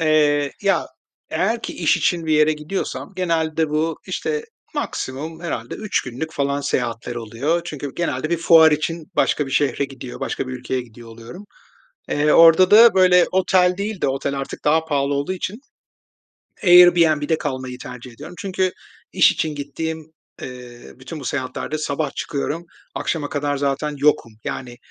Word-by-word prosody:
Eee, 150 -2 +2
ya, 200 -1 +2 0.4
eğer - - 0
ki - - -5
iş - - +2
için 170 -3 0
bir 155 - +1
yere 155 0 +4
gidiyorsam 155 +6 -5
genelde 160 -3 0
bu, 155 +1 -1
işte, 455 0 -3 0.3
maksimum 155 +5 -4
herhâlde 120 -9 -4
3 215 - -1
günlük 135 +6 -6
falan 140 -2 -1
seyahatler 120 -3 -2
oluyor. 120 +9 -1
Çünkü 145 -3 -6
genelde 155 -2 -2
bir 170 - +2
fuar 160 -2 +6
için 160 +2 -3
başka 150 - +1
bir - - -8
şehre 140 +1 +1
gidiyor, 135 -2 -9
başka 130 - -3
bir - - -5
ülkeye 125 0 -3
gidiyor 120 -1 -13
oluyorum. 115 - -11 0.7
Eee, 150 +1 +2
orada 165 +3 +7
da 225 -1 +8
böyle 180 -1 +5
otel 185 -1 +3
değil 205 -1 -4
de, - - +2
otel 135 +1 -2
artık 135 - -7
daha 160 +2 +3
pahalı 140 -2 0
olduğu 140 +6 -1
için, 195 +5 -5 1.0
Airbnb'de 170 -4 +6
kalmayı 130 -3 -4
tercih 125 0 -9
ediyorum. 180 - -11
Çünkü 185 -2 -1 0.4
iş - - +5
için 155 -2 -2
gittiğim, 160 +2 -5 0.3
ııı, 125 -1 -10
bütün 145 +4 -8
bu - - -9
seyahatlerde 135 +3 -3
sabah 150 -1 -2
çıkıyorum, 160 +2 -3 0.3
akşama 150 -3 -2
kadar 145 0 -2
zaten 140 +2 -1
yokum. 140 -5 +1
Yani, 125 -2 -5
150 Hz, 155 wpm, -21 LUFS, 135-165 Hz, 1.0 s, da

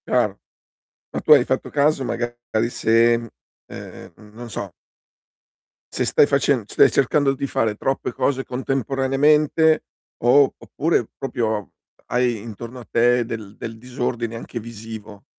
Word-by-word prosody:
Chiaro, - - +1 0.7
ma - - -2
tu - - +1
hai 140 -5 +8
fatto 130 - -2
caso 145 -1 +2
magari 120 -1 -2
se, 115 0 +3
mhmm, 115 -1 -8 0.4
ehm, 105 +5 -11
non 120 +1 -9
so 105 - -6 1.2
se - - 0
stai - - +5
facen - - +2
stai - - +4
cercando 140 +1 +2
di 140 +1 -3
fare 110 -4 0
troppe 135 +5 -2
cose 135 -1 0
contemporaneamente 135 +5 +2 0.4
o, 135 +3 +5
oppure, 155 -5 -1
proprio 110 -6 -2 0.3
hai 125 -1 +1
intorno 115 +3 -8
a 120 - -11
te 120 +1 +3
del 110 -3 -7
del 115 -1 -7
disordine 120 -1 -3
anche 120 0 -7
visivo. 110 -2 -9
120 Hz, 135 wpm, -22 LUFS, 115-135 Hz, 1.2 s, hai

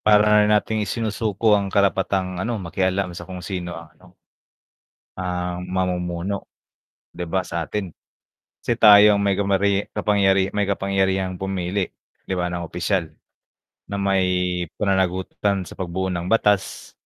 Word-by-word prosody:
para 105 0 +5
nating 105 +1 +1
isinusuko 110 -1 0
ang 100 -1 +2
karapatang, 95 -2 0
ano, 115 +3 -2
makialam 95 0 -1
sa 85 - -9
kung 90 -1 -7
sino 90 -3 -5
ang, 85 -1 -10
ano 90 0 -20 1.0
ah, 90 -1 -3
mamumuno, 90 +1 -2 0.7
'di 90 - -4
ba, 95 - +1
sa 85 -1 -3
atin, 95 -5 -5 0.7
'si 120 - +1
tayo 105 -1 +8
ang 100 - 0
may 100 -1 +2
kamarye 100 0 +1
kapangyari 95 -2 +2
may 105 - +1
kapangyarihang 95 -1 0
pumili, 95 0 -2 0.4
'di 95 - -2
ba, 90 -1 -1
ng 85 0 -4
opisyal, 85 0 -1 0.8
na 100 - -3
may 100 -1 +1 0.5
pananagutan 95 0 0
sa - - -12
pagbuo 95 +1 -2
ng 85 -1 -3
batas. 100 - +1
95 Hz, 135 wpm, -22 LUFS, 90-100 Hz, 1.0 s, tayo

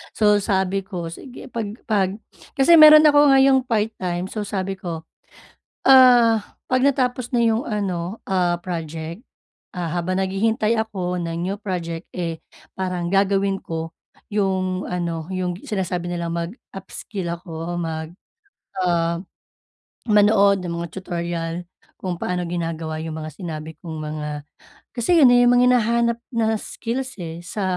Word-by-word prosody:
So 210 -1 +4
sabi 190 -1 0
ko, 180 -4 -6
sige 250 +7 -11
pag 215 -3 -4
pag 195 -3 0 0.4
kasi 315 +5 +6
meron 305 0 +10
ako 295 -1 +6
ngayong 265 -1 +4
part-time. 190 -5 -2
So, 210 -2 -4
sabi 195 -1 -3
ko, 165 -3 -5 0.8
ah, 245 -4 +7 0.2
pag 255 0 +1
natapos 255 -3 +1
na 245 - +1
'yong 225 +1 +2
ano, 195 -1 -2
ah, 180 -2 +1
project, 165 +2 -6 0.5
ah, 180 -2 -4
habang 180 +2 -1
naghihintay 215 +4 +1
ako 185 -5 -4
ng 170 +1 -3
new 195 +2 -2
project, 170 -3 -4
eh, 165 -3 -4 0.3
parang 180 -2 -3
gagawin 195 +1 +1
ko 165 0 -5 0.4
'yong 190 -2 0
ano 170 -1 -3
'yong 185 -1 -2
sinasabi 180 -3 -3
nilang 170 -1 -3
mag-upskill 190 +1 -6
ako. 170 0 -5
Mag 160 -1 -4 0.7
ah, 170 -1 +1 0.9
manood 200 -2 +4
ng 170 - -3
mga 170 - -4
tutorial 170 -2 -3 0.5
kung 180 -2 -3
paano 180 0 -2
ginagawa 165 -2 -3
yung 160 -1 -5
mga 155 0 -6
sinabi 160 -3 -6
kong 160 -3 -7
mga 150 0 -4 0.7
kasi 250 +9 +3
yun 270 - +8
na 245 - +6
yung 245 - +5
mga 250 - +5
hinahanap 235 0 +2
na 225 -3 +1
skills, 250 +3 -5
eh, 170 -1 -6
sa 195 +4 -5
185 Hz, 140 wpm, -22 LUFS, 170-220 Hz, 0.9 s, meron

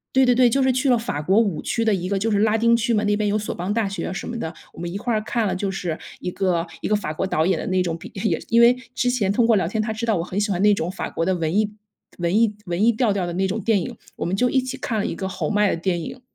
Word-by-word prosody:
对 265 - +6
对 250 - +5
对， 245 0 +5
就 270 +3 +2
是 260 - +4
去 255 +2 +1
了 245 - +5
法 225 -10 -3
国 190 +8 +3
五 200 -9 0
区 230 -1 -1
的 220 - +3
一 180 0 -2
个 200 - 0
就 220 +3 0
是 200 - +2
拉 220 +1 +3
丁 235 +1 +4
区 235 0 +1
嘛， 210 - +1
那 205 0 +2
边 210 -1 0
有 210 - +1
索 210 - -3
邦 180 +4 -3
大 220 -2 +1
学 195 - -4
啊 - - -4
什 195 - -5
么 235 - -4
的。 160 - -3 0.2
我 - - -13
们 175 0 -4
一 190 - -4
块 240 +3 -2
儿 215 - +1
看 230 0 -1
了， 190 - -1
就 195 +1 -2
是 180 -4 -3 0.2
一 180 - -4
个 180 -3 0 0.2
一 - - -2
个 210 - +2
法 185 -7 -3
国 190 +5 -2
导 160 -3 +1
演 185 -1 +2
的 - - -5
那 185 -1 +1
种 165 -2 -2
比 - - -11
也 205 +3 0
因 230 +1 +4
为 240 +1 +7 0.2
之 250 - +1
前 205 -6 +1
通 230 +3 +3
过 230 -1 +4
聊 185 -5 +1
天， 215 +4 -1
她 220 0 -2
知 230 +2 -3
道 220 - +3
我 165 - -1
很 180 +3 -3
喜 210 0 0
欢 185 0 -1
那 210 0 +6
种 175 -3 -2
法 190 - -5
国 165 - -1
的 190 +1 +1
文 165 +1 -1
艺 210 0 +2 0.5
文 175 +5 +1
艺 215 -3 +2
文 175 +3 -1
艺 235 - +6
调 220 -2 +1
调 195 -3 -1
的 170 - -4
那 190 +2 0
种 190 - -2
电 220 -5 +2
影， - - -6 0.2
我 - - -4
们 180 - 0
就 250 +5 +2
一 265 - +3
起 260 +1 -5
看 230 -4 -2
了 - - -1
一 - - -2
个 190 - -4
侯 180 - -3
麦 210 -1 +3
的 - - 0
电 175 0 -1
影。 250 +9 -7
205 Hz, 365 characters per minute, -22 LUFS, 185-230 Hz, 0.5 s, 为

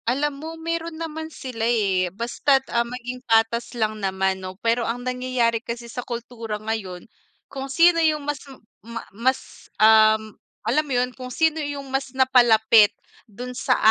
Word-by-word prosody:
Alam 285 +4 0
mo 320 - -6
meron 330 0 -4
naman 320 -1 -5
sila, 255 -7 -8
eh, 195 -6 +1
basta't, 240 +7 +1
ah, 235 - +3
maging 250 +1 -6
patas 225 +2 +2
lang 215 -1 -1
naman 190 0 0
no. 185 0 -7
Pero 230 +1 +2
ang 245 +2 -3
nangyayari 250 -2 0
kasi 235 0 -6
sa 235 +1 -6
kultura 235 -2 -5
ngayon, 210 -4 -5 0.5
kung 270 0 -6
sino 335 +4 +5
yung 305 -2 +1
mas 290 0 -3 0.4
ma 230 +2 -7
mas, 255 +5 -2
um, 220 0 +5 0.3
alam 305 - +2
mo 280 - -4
yun 250 +1 +1
kung 255 0 -8
sino 320 +4 +1
yung 285 -1 -4
mas 270 0 -1
napa-lapit 230 -5 +5 0.4
dun 245 +5 -7
sa 250 - +1
240 Hz, 160 wpm, -23 LUFS, 220-270 Hz, 0.5 s, sino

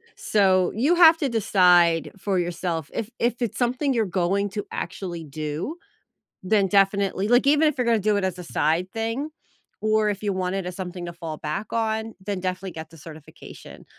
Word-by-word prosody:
So, 190 -3 +2
you 280 +11 +2
have 330 -2 +8
to 285 -5 0
decide 180 -7 +3
for 195 -1 -1
yourself, 170 -3 -3
if 230 +1 -4
if 240 0 0
it's 235 -4 -2
something 255 +3 +1
you're 225 -3 +1
going 190 +2 0
to 205 0 -4
actually 175 -4 -5
do, 155 - -5 0.7
then 200 +1 +2
definitely 195 0 +2
like, 245 +4 +4
even 300 +2 +4
if 300 - -1
you're 250 - 0
gonna 230 -1 +3
do 210 +1 +1
it 200 - -1
as 185 -1 -2
a - - -6
side 165 +3 0
thing, 230 +6 -3 0.5
or 215 0 +2
if 205 0 -4
you 205 -2 0
want 185 0 -2
it 195 -2 -3
as 180 0 -5
something 180 -1 -6
to 170 - -7
fall 165 -2 -6
back 155 +9 -5
on, 220 0 -1
then 200 -2 -2
definitely 185 +1 -4
get 160 -1 -8
the 165 - -15
certification. 155 0 -12
195 Hz, 195 wpm, -24 LUFS, 175-225 Hz, 0.7 s, have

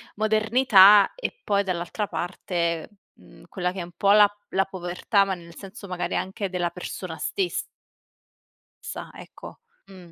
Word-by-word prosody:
modernità 215 -2 +5
e - - -5
poi 200 -1 +1
dall'altra 185 +2 -3
parte, 170 -3 -3 0.3
mhmm, - - -18
quella 180 -2 -2
che 190 - -6
è - - -3
un 170 - -11
po' 200 0 +3
la 210 -1 +7 0.2
la 195 0 +1
povertà 190 +2 0
ma 195 - -2
nel 170 -2 -11
senso 200 +1 -11
magari 180 -1 -3
anche 190 +2 -3
della 175 -1 -1
persona - - -7
stes 385 -3 -2 1.2
sa, - - -7
ecco. - - -12 0.3
Mh, 180 -3 -14
195 Hz, 150 wpm, -24 LUFS, 175-210 Hz, 1.2 s, la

